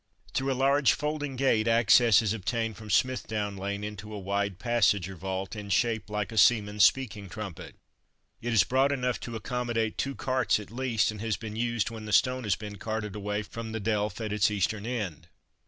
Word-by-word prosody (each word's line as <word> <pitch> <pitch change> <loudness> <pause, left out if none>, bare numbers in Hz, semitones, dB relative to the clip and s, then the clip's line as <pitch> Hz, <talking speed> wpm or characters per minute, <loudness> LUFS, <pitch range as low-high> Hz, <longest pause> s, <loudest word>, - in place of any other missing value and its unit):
Through 135 +1 0
a - - 0
large 140 +1 +4
folding 145 -2 -3
gate 120 -4 +2
access 115 -1 +5
is 105 -1 +1
obtained 115 +1 -2
from 110 -1 -11
Smithdown 105 -2 0
lane 100 +1 -4
into 105 0 -7
a 105 - -5
wide 100 0 -2
passage 105 -5 +2
or 95 - -8
vault, 95 +3 -4
in 105 -1 -7
shape 110 +2 +1
like 105 0 -2
a 110 - +1
seaman's 105 -2 +4
speaking 110 -7 +2
trumpet. 100 -3 -7 0.7
It 120 - -2
is 110 -6 +5
broad 130 +8 +2
enough 125 -3 -1
to 120 - -6
accommodate 115 -1 -2
two 140 0 -1
carts 130 -4 +1
at 105 -1 -10
least, 120 -3 +1
and 105 -1 -8
has 110 -3 -1
been 110 -1 -7
used 115 -1 -1
when 110 -1 -8
the 105 - -4
stone 125 +2 +3
has 100 -3 +2
been 105 -1 -8
carted 105 -1 -4
away 105 0 -2
from 110 +1 -7
the 110 - -2
delph 105 -2 -1
at 105 - -3
its 105 -1 +3
eastern 105 +1 -1
end. 95 -10 -4
110 Hz, 200 wpm, -28 LUFS, 105-120 Hz, 0.7 s, access